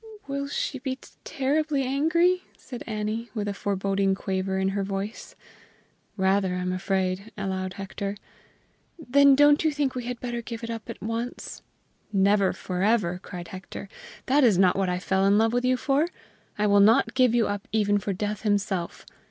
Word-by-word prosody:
"Will 280 0 -3
she 280 -1 -3
be 260 0 -3 0.3
terribly 285 +1 0
angry?" 325 +7 +2 0.2
said 245 -2 -8
Annie, 215 +1 -3
with 205 -2 -2
a 205 - -1
foreboding 195 -1 0
quaver 190 0 -2
in 190 0 +1
her 195 0 -1
voice. 195 +2 -5 0.8
"Rather, 190 -1 +2
I 180 - -2
am 180 0 -1
afraid," 190 +2 -1
allowed 190 -2 -3
Hector. 195 +1 -5 0.8
"Then 280 -2 +5
don't 290 +2 +5
you 315 - +3
think 290 -3 -1
we 250 -2 -5
had 245 -1 -4
better 240 -1 -4
give 230 0 -7
it 230 - -4
up 230 +1 -7
at 230 - -7
once?" 230 +2 -4 0.5
"Never 200 -1 +3
forever!" 185 -1 0
cried 175 -4 -8
Hector. 190 +1 -8 0.4
"That 280 +2 +3
is 220 -7 +5
not 185 -1 +4
what 195 -1 0
I 180 - 0
fell 190 +1 0
in 200 +1 +4
love 225 +1 +3
with 245 +1 +1
you 255 0 +3
for! 280 +5 +1 0.5
I 210 - +1
will 205 -1 +5
not 215 +3 +5
give 255 -3 +3
you 235 -2 +3
up 205 -1 -4
even 205 -1 +2
for 200 - -3
Death 210 +2 -3
himself! 200 -4 -1
210 Hz, 175 wpm, -26 LUFS, 195-250 Hz, 0.8 s, Then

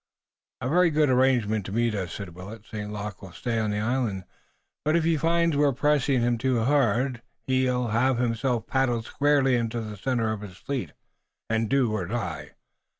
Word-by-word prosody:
"A 125 - -2
very 175 +5 +4
good 150 -3 +2
arrangement 125 -5 +2
to - - -6
meet 115 +1 +1
us," 95 -5 -3
said 95 -4 -7
Willet. 100 +5 -10
"St. 105 -1 -6
Luc 105 -2 -6
will 95 -4 -11
stay 115 +1 -2
on 110 -1 0
the 105 - -1
island, 110 -3 -1 0.6
but 155 +2 +2
if 170 - +2
he 165 0 +2
finds 165 +1 +2
we're 145 -1 +3
pressing 140 -1 +2
him 120 -1 +1
too 125 -2 +1
hard, 125 -2 +1 0.2
he'll 125 -2 +1
have 120 +3 +2
himself 120 0 0
paddled 120 -4 0
squarely 140 -1 +2
into 120 -1 0
the 110 -2 -6
center 115 +1 -1
of 105 - -6
his 95 -3 -9
fleet, 125 - -4 0.6
and 110 -1 +1
do 135 -5 +2
or 100 -5 -2
die. 90 -8 -4
120 Hz, 185 wpm, -26 LUFS, 105-135 Hz, 0.6 s, very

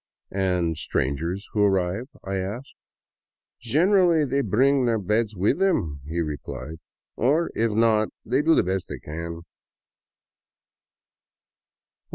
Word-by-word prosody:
*' - - -54
And 90 -4 0
strangers 85 +11 -2
who 105 - +1
arrive? 95 +3 +1
" - - -48
I 95 0 -3
asked. 105 +9 -5 0.5
" - - -69
Generally 160 - +3
bring 130 +5 +3
their 115 -2 +2
beds 105 +2 0
with 95 - +1
them," 95 - +1
he 85 +2 -1
replied, 75 +1 -6 0.2
" - - -69
or, 150 +8 +1
if 115 0 +1
not, 110 0 +3 0.2
they 130 +4 +2
do 160 +2 +4
the - - +4
best 95 0 -2
they - - -5
can." 85 +2 -6
105 Hz, 135 wpm, -24 LUFS, 90-130 Hz, 0.5 s, do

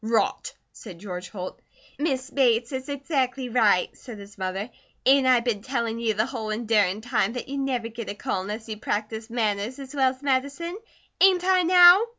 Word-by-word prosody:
"Rot!" 225 - 0 0.2
said 175 - -11
George 180 -1 -7
Holt. 185 -3 -7 0.4
"Miss 270 -3 -1
Bates 240 -3 +2
is 260 +1 -5
exactly 270 -3 -2
right," 220 -6 +2
said 240 -5 -10
his 200 0 -12
mother. 190 +4 -4 0.3
"Ain't 270 0 +5
I 250 -2 +5
been 230 -4 -1
tellin' 235 -2 -2
you 225 -2 0
the 215 +2 +1
whole 225 -4 -5
endurin' 215 -3 +1
time 230 -3 0
that 245 - -5
you'd 280 +1 -4
never 255 -4 -1
get 230 -1 -7
a 200 - -4
call 190 - -2
unless 210 +4 -6
you 215 -1 -5
practised 220 +2 -3
manners 220 0 -1
as 275 0 -9
well 265 -2 +3
as 260 +2 -10
medicine? 280 +7 -1 0.4
Ain't 370 -2 +5
I, 370 0 +4
now?" 355 +2 +8
235 Hz, 185 wpm, -25 LUFS, 215-270 Hz, 0.4 s, now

